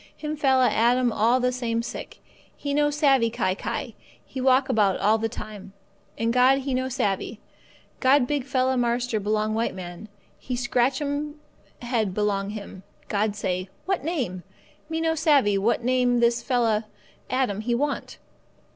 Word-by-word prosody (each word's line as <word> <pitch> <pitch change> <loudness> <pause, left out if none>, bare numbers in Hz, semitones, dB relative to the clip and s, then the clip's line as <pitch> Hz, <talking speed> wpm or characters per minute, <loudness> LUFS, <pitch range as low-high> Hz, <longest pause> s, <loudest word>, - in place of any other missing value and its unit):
Him 305 0 -4
fella 265 -3 +3
Adam 240 +2 +3
all 235 +4 +3
the 250 0 +1
same 235 -2 -2
sick; - - -8 0.3
he 285 -1 -3
no 295 0 +3
savvee 275 -5 +3
kai 185 -4 0
kai; - - -4 0.3
he 260 - -6
walk 260 +1 +4
about 210 -7 +2
all 215 +2 +3
the 225 +1 -1
time. 210 -4 -9 0.4
And 230 +1 0
God 255 +2 +5
He 270 0 -3
no 260 +1 -1
savvee. 220 -4 -1 0.6
God 260 0 +4
big 285 0 -1
fella 260 -1 +1
marster 240 -1 0
belong 215 +1 0
white 225 -3 -1
man, 180 +3 -8 0.3
He 250 - -4
scratch 245 +2 +1
'm 290 +1 -3 0.4
head 225 -6 -1
belong 205 -1 0
Him. 205 -3 -8 0.3
God 210 0 0
say: 185 -2 -2 0.2
'What 385 -1 -1
name? 255 - -2 0.5
Me 325 0 -2
no 325 0 +2
savvee 280 - +3
what 230 +4 +1
name 250 -1 +2
this 235 0 +2
fella 230 -4 +1 0.4
Adam 250 -6 0
he 235 +2 0
want. 285 +3 -2
245 Hz, 160 wpm, -25 LUFS, 215-265 Hz, 0.6 s, God